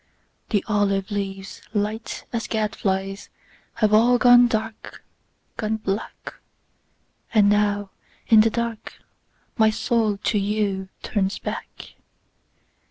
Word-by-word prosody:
The 205 -4 0
olive 205 -1 0
leaves, 195 -1 -5
light 210 +2 -3
as 230 -2 -2
gad 215 -2 -1
flies, 195 0 -2 0.5
Have 215 -2 +2
all 240 +3 +5
gone 245 0 +7
dark, 220 -1 -5 0.5
gone 220 -1 -1
black. 205 0 -5 1.0
And 210 -2 +6
now 205 -1 +1 0.3
in 220 -2 +7
the 225 - +3
dark 235 -1 -4 0.7
my 220 0 +6
soul 220 -1 0
to 210 +1 0
youTurns 200 -1 -2
back. - - -7
210 Hz, 105 wpm, -23 LUFS, 200-225 Hz, 1.0 s, gone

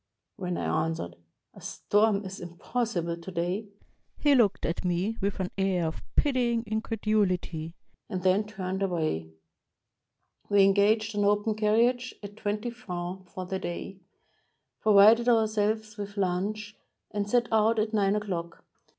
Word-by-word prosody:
When 180 -4 -3
I 155 0 0
answered, 85 - -4 0.4
"A - - -14
storm 205 -1 +1
is 190 +1 -7
impossible 175 0 -3
to 170 +3 -9
day," 180 +5 -2 0.5
he 290 -1 +4
looked 225 -7 +3
at 165 - -2
me 180 +5 0
with 200 +1 -1
an 185 -1 -2
air 190 -3 +1
of 160 - -4
pitying 245 -5 +2
increduhty, 210 -7 -1 0.4
and 185 -4 -3
then 190 +3 +3
turned 190 -2 -4
away. 155 - -1 1.2
We 205 -1 +6
engaged 210 +3 +3
an 205 - +1
open 205 +2 +2
carriage 235 +4 +2
at 205 0 -8
twenty 210 +2 -2
francs 185 -5 -6
for 185 - -5
the 190 +1 -3
day, 190 +2 -6 0.8
provided 220 +3 +6
ourselves 220 -1 +1
with 205 0 -6
lunch, 200 +3 -1 0.4
and 205 0 -2
set 240 +1 +3
out 220 +1 +3
at 215 +1 0
nine 200 -1 +2
o'clock. 180 -5 -4
205 Hz, 140 wpm, -28 LUFS, 180-220 Hz, 1.2 s, We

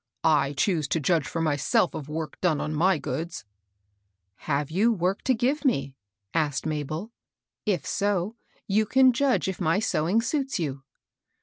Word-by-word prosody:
"I 150 -3 +3
choose 155 0 +1
to 165 - 0
judge 160 +1 +1
for 165 - -3
myself 150 +2 +1
of 145 -1 -6
work 155 0 -5
done 170 -5 +2
on 155 - -2
my 180 +4 +3
goods." 145 -3 -5 1.0
Have 145 +1 0
you 210 +8 +3
work 190 -2 0
to 260 - +3
give 265 +7 0
me? 140 - 0 0.2
" 100 0 -53
asked 150 -4 0
Mabel. 155 +7 -3 0.3
" - - -65 0.2
If 180 -9 0
so 205 0 0 0.3
you 215 +2 +2
can 260 +2 +5
judge 265 -2 +1
if 190 0 -4
my 165 +1 +2
sewing 190 -1 +1
suits 270 +3 -1
you." 140 -6 -3
165 Hz, 170 wpm, -26 LUFS, 150-210 Hz, 1.0 s, can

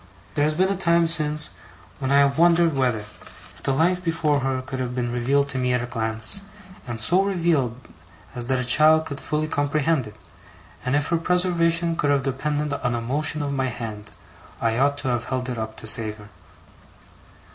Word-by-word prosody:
There 145 - +1
has 155 0 0
been 185 +3 +2
a - - 0
time 170 -2 +3
since 150 -2 -1 0.5
when 135 -2 -2
I 140 - +5
have 140 +1 +2
wondered 170 -2 +4
whether, 125 -5 +1 0.5
if - - -14
the - - 0
life 175 +6 +1
before 160 -4 +1
her 130 -1 -2
could 130 0 -6
have 125 -1 -3
been 120 -1 -2
revealed 135 +4 +1
to 130 -2 -2
me 125 0 +1
at 125 -1 0
a - - -2
glance, 110 - -3 0.5
and 120 -2 -5
so 175 - +5
revealed 165 - 0 0.6
as 120 -2 -4
that 130 0 +1
a 125 - -2
child 155 +5 +5
could 140 -3 -6
fully 155 0 -1
comprehend 145 -2 0
it, 105 - -12 0.7
and 130 +2 0
if 145 -1 0
her 170 - +2
preservation 170 -1 +2
could 145 - 0
have 140 -2 +2
depended 145 +2 -2
on 125 -4 -1
a - - -1
motion 145 +5 -2
of 140 -1 -2
my 135 -1 0
hand, 110 -3 -6 0.5
I 115 0 0
ought 140 +1 +2
to 145 -1 -4
have 120 -1 -1
held 130 -1 -3
it 120 -2 -4
up 110 0 -5
to - - -8
save 110 -1 +2
her. 105 -1 -14
140 Hz, 200 wpm, -23 LUFS, 125-160 Hz, 0.7 s, I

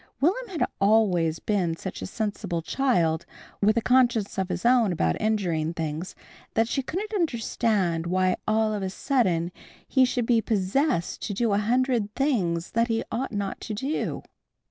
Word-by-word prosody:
Will'm 395 - +1
had 365 -6 0
always 195 -6 +3
been 180 -5 0
such 190 +3 -7
a - - -4
sensible 200 -6 -3
child, 170 -11 +1 0.3
with 215 +3 +3
a - - +3
conscience 240 -6 +2
of 190 0 -1
his 180 +2 -3
own 240 -4 +4
about 85 - +1
injuring 170 -7 0
things, 160 +2 -4 0.4
that 225 0 +3
she 270 - -1
couldn't 390 +11 -4
understand 220 - 0
why 185 +1 +2
all 215 0 +2
of 205 - -2
a 190 - -2
sudden 185 - 0 0.4
he 265 - +4
should 250 -2 +1
be 230 -1 +3
possessed 215 - 0
to 205 - -4
do 225 0 +1
a 200 - +3
hundred 235 -1 +1
things 185 - 0
that 230 +1 +2
he 225 -1 0
ought 250 +4 -2
not 200 -2 -3
to 215 - -4
do. 270 +8 -2
215 Hz, 165 wpm, -26 LUFS, 180-245 Hz, 0.4 s, own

